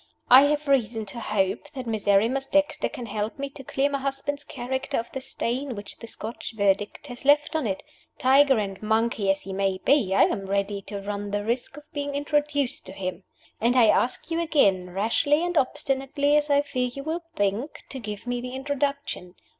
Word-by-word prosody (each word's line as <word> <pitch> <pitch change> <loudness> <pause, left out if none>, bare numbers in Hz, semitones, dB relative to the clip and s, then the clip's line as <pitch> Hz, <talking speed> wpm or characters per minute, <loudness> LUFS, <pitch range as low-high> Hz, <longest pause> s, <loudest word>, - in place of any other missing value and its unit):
"I 260 +3 +10
have 300 +1 0
reason 230 -5 +1
to 205 +4 -6
hope 210 +5 -1
that 260 -2 -5
Miserrimus 225 +4 +2
Dexter 295 +1 +1
can 245 - -7
help 215 0 -3
me 280 0 -4
to 270 - -10
clear 270 +2 +1
my 280 -1 -2
husband's 275 +1 -3
character 260 -1 -3
of 230 +1 -3
the 265 - -5
stain 260 0 -2
which 205 0 -8
the 230 - -9
Scotch 225 +1 -6
Verdict 200 +4 +1
has 245 -4 -8
left 290 +3 +4
on 310 -7 +1
it. 190 -2 -3 0.3
Tiger 270 0 +5
and 195 -3 -3
monkey 220 -1 +1
as 195 0 +2
he 195 - -6
may 195 -1 0
be, 255 -10 +3
I - - +6
am 195 -1 0
ready 200 +1 -1
to 200 0 -5
run 205 0 -4
the 205 0 -2
risk 245 +4 -2
of 295 - -11
being 285 -1 -3
introduced 290 -2 0
to 190 - -8
him. 185 -1 -5 0.3
And 235 +3 +2
I 235 -4 +6
ask 255 +6 +1
you 330 - +1
again 200 - +2
rashly 260 - +2
and 350 0 -2
obstinately 275 +1 +1
as 300 0 +2
I 285 0 +4
fear 255 -3 -1
you 275 +3 -7
will 320 +3 -2
think 205 +8 -1
to 265 - -6
give 210 -2 -6
me 245 0 -2
the 250 +1 -6
introduction. 280 -8 -2
250 Hz, 200 wpm, -26 LUFS, 205-285 Hz, 0.3 s, I